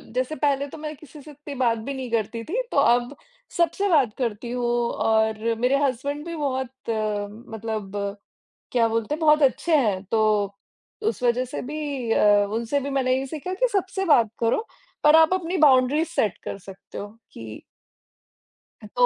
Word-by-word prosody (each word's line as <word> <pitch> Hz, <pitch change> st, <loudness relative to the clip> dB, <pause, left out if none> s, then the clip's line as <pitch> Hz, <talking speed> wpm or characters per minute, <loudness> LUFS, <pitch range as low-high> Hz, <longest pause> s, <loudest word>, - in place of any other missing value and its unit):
जैसे 255 Hz, +4 st, -1 dB
पहले 285 Hz, -2 st, 0 dB
तो -, -, -10 dB
मैं 305 Hz, 0 st, -6 dB
किसी 300 Hz, 0 st, -14 dB
से 300 Hz, -, -12 dB
इत्ती 290 Hz, 0 st, -9 dB
बात 240 Hz, -3 st, +2 dB
भी 225 Hz, +5 st, -5 dB
नहीं 260 Hz, -2 st, -5 dB
करती 230 Hz, 0 st, -1 dB
थी, 410 Hz, -, -2 dB
तो -, -, -2 dB
अब 245 Hz, 0 st, +3 dB, 0.4 s
सबसे 345 Hz, +4 st, +1 dB
बात 275 Hz, -, +3 dB
करती 235 Hz, -1 st, -3 dB
हूँ 245 Hz, 0 st, -2 dB, 0.3 s
और 220 Hz, -1 st, +1 dB, 0.2 s
मेरे 250 Hz, +3 st, +3 dB
हस्बैंड 280 Hz, +3 st, -2 dB
भी 340 Hz, 0 st, -5 dB
बहुत 265 Hz, -4 st, -2 dB, 0.8 s
मतलब 220 Hz, -3 st, -5 dB, 0.8 s
क्या 235 Hz, -2 st, +3 dB
बोलते 230 Hz, +4 st, -1 dB
हैं? 310 Hz, -, -7 dB
बहुत 305 Hz, -1 st, +4 dB
अच्छे 295 Hz, +5 st, +3 dB
हैं, 210 Hz, -9 st, +1 dB
तो 210 Hz, -2 st, +2 dB, 0.5 s
उस 445 Hz, -, -1 dB
वज़ह 245 Hz, +1 st, +2 dB
से 255 Hz, -, -6 dB
भी 285 Hz, -3 st, -4 dB
अ, 205 Hz, -1 st, +4 dB
उनसे 230 Hz, +6 st, -1 dB
भी 280 Hz, +1 st, -4 dB
मैंने 260 Hz, -2 st, +1 dB
ये 270 Hz, -, -3 dB
सीखा 315 Hz, +6 st, -5 dB
कि -, -, +1 dB
सबसे 385 Hz, -1 st, -1 dB
बात 240 Hz, -, +4 dB
करो, 235 Hz, -, +1 dB, 0.4 s
पर 300 Hz, +1 st, +7 dB
आप 320 Hz, +2 st, +5 dB
अपनी 360 Hz, 0 st, -2 dB
बाउंड्रीज़ 275 Hz, +4 st, +3 dB
सेट 215 Hz, -, 0 dB
कर -, -, -5 dB
सकते 195 Hz, 0 st, -11 dB
हो 205 Hz, -, -5 dB, 0.3 s
कि 110 Hz, -1 st, -9 dB, 1.2 s
ह -, -, -8 dB
तो 245 Hz, -, +5 dB
260 Hz, 175 wpm, -24 LUFS, 230-300 Hz, 1.2 s, पर